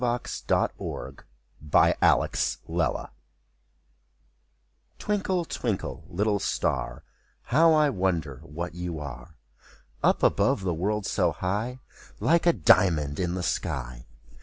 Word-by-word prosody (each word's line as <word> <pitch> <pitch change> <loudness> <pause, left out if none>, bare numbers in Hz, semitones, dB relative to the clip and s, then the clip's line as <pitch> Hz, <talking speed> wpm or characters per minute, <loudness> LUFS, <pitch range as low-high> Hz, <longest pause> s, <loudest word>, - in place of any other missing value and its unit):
373 120 - -2 0.4
MY 75 - -12
BOOK - - +5
HOUSE - - +2
THE - - -7
STAR - - -5 1.9
Twinkle, 190 -4 -1
twinkle, 115 -10 -3
little 105 +3 0
star. - - -2 0.4
How 160 +6 +4
I 150 -2 +4
wonder 85 - -1
what 85 +2 -6
you 90 -1 -5
are! 70 0 -8 0.7
Up - - +2
above - - +3
the 90 -2 0
world, 100 +5 -1
so 90 -5 +1
high, 105 +9 -2 0.4
Like 170 +1 +2
a 170 - +6
diamond 80 -6 +3
in 90 -1 -1
the 90 - -3
sky. 60 -4 -3
90 Hz, 115 wpm, -27 LUFS, 80-120 Hz, 1.9 s, a